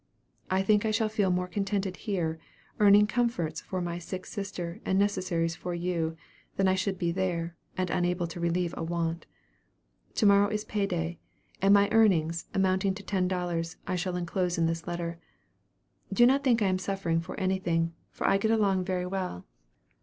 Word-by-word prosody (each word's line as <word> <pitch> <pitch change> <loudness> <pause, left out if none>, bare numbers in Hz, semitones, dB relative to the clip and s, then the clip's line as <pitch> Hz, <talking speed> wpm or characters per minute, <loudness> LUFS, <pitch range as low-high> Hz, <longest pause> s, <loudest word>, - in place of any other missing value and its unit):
I 190 +1 +2
think 210 +1 +3
I 220 - +1
shall 220 0 +1
feel 210 -3 +1
more 180 0 0
contented 195 -1 -2
here, 170 -7 -2 0.4
earning 205 0 +7
comforts 210 -9 -1
for 185 -1 -4
my 175 0 -3
sick 185 +2 -6
sister 195 -2 -5
and 190 - +1
necessaries 185 -4 +1
for 175 +1 -4
you, 170 -2 -1 0.4
than 195 - +2
I 185 - +4
should 190 0 -1
be 170 -1 0
there, 170 -2 -2 0.2
and 185 -1 -1
unable 175 0 0
to 170 +1 -7
relieve 170 0 0
a - - -5
want. 165 0 -2 0.9
'To 220 - +2
morrow 200 0 +6
is 215 0 -2
pay 205 -2 -1
day,' 170 -2 -3 0.4
and 195 +1 +4
my 200 0 +5
earnings, 170 -7 +3
amounting 190 0 +1
to 200 - -9
ten 190 -2 0
dollars, 175 -2 -2
I - - -1
shall 180 0 -2
enclose 180 0 -1
in 165 - +2
this 165 0 -2
letter. 170 -1 -4 0.9
Do 240 +5 +5
not 270 +3 +4
think 235 -5 +3
I - - +3
am 185 0 +1
suffering 185 -3 -1
for 180 +4 -7
anything, 175 -3 0 0.2
for - - -5
I 195 - +4
get 220 - +1
a 225 - +4
long 195 -3 +2
very 180 -1 -1
well. 180 - -4
185 Hz, 185 wpm, -29 LUFS, 170-200 Hz, 0.9 s, earning